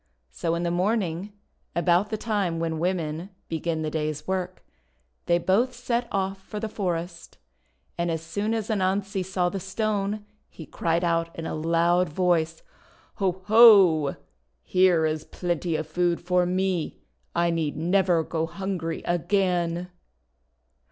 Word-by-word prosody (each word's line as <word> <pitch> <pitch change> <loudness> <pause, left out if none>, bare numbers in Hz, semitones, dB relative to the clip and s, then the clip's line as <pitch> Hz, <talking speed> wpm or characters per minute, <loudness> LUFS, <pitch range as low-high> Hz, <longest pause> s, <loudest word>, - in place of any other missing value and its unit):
So 165 - -1
in 170 - -2
the 170 - 0
morning, 185 0 0 0.4
about 175 +4 +2
the 215 - -2
time 205 -6 -1
when 165 -1 -2
women 170 0 -2 0.2
begin 160 0 -2
the 155 - -2
day's 155 -1 -3
work, 185 -1 -3 0.6
they 170 - +4
both 220 +9 +1
set 240 0 -1
off 195 0 -2
for 210 +2 -7
the 220 - -3
forest. 175 -4 -4 0.6
And 170 0 0
as 165 -1 -2
soon 205 +7 -2
as 220 -1 -3
Anansi 195 -1 0
saw 180 -1 0
the 195 - -4
Stone 205 +1 -2 0.2
he 160 - -10
cried 165 +4 -1
out 165 -1 +1
in 165 - -5
a - - -3
loud 170 +2 +2
voice: 165 -1 0 0.3
— - - -31
"Ho! 190 -1 -1
ho! 200 -10 +7 0.5
Here 180 - +3
is 155 0 -2
plenty 175 -1 -2
of 155 0 -2
food 175 +2 0
for 180 0 +1
me! 185 -2 -1 0.3
I 170 0 +2
need 160 -3 -1
never 175 0 +2
go 160 0 -2
hungry 180 -3 -4
again!' 175 -1 0
175 Hz, 145 wpm, -26 LUFS, 165-195 Hz, 0.6 s, ho